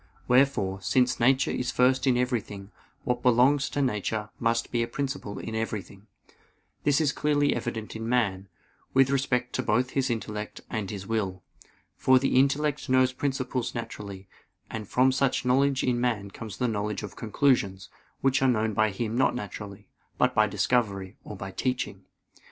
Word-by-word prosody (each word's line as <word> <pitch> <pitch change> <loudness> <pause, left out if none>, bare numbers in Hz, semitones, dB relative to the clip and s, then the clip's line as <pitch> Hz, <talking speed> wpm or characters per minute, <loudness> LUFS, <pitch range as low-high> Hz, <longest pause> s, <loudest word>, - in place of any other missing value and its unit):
Wherefore, 125 -7 +2
since 125 +6 +2
nature 130 +3 +3
is 125 0 -2
first 130 +1 +2
in 125 -2 +4
everything, 110 -5 -2 0.3
what 125 -2 -1
belongs 130 +4 +4
to 145 - -1
nature 105 -2 -2
must 115 0 0
be 120 - +1
a 115 - 0
principle 135 -5 -4
in 110 - -6
everything. 105 -2 -4 0.8
This 145 -1 +3
is 150 -3 +2
clearly 145 -1 +1
evident 115 -2 -4
in 115 +1 -4
man, 100 -6 0 0.5
with 135 0 +5
respect 125 -2 0
to - - 0
both 125 +4 +1
his 135 -1 0
intellect 105 -2 -4
and 105 -3 -3
his 100 -2 -6
will. 95 -4 -2 0.5
For 130 0 +5
the 130 0 +3
intellect 145 +1 +1
knows 130 0 +4
principles 130 -2 -2
naturally; 100 -4 -7 0.4
and 110 -2 -5
from 130 +5 +3
such 130 -1 +1
knowledge 135 +2 +2
in 120 -2 +1
man 110 -5 -1
comes 105 -1 -8
the 125 - 0
knowledge 105 -2 -2
of 100 -2 -7
conclusions, 110 -5 +1 0.3
which 135 0 +2
are 135 - +4
known 110 -2 +1
by 110 +1 +3
him 110 +3 -3
not 130 +3 +2
naturally, 105 -3 -7 0.3
but - - +3
by - - +4
discovery, 100 -6 0
or 105 - -8
by 95 0 -6
teaching. 125 +5 -3
120 Hz, 165 wpm, -27 LUFS, 105-130 Hz, 0.8 s, with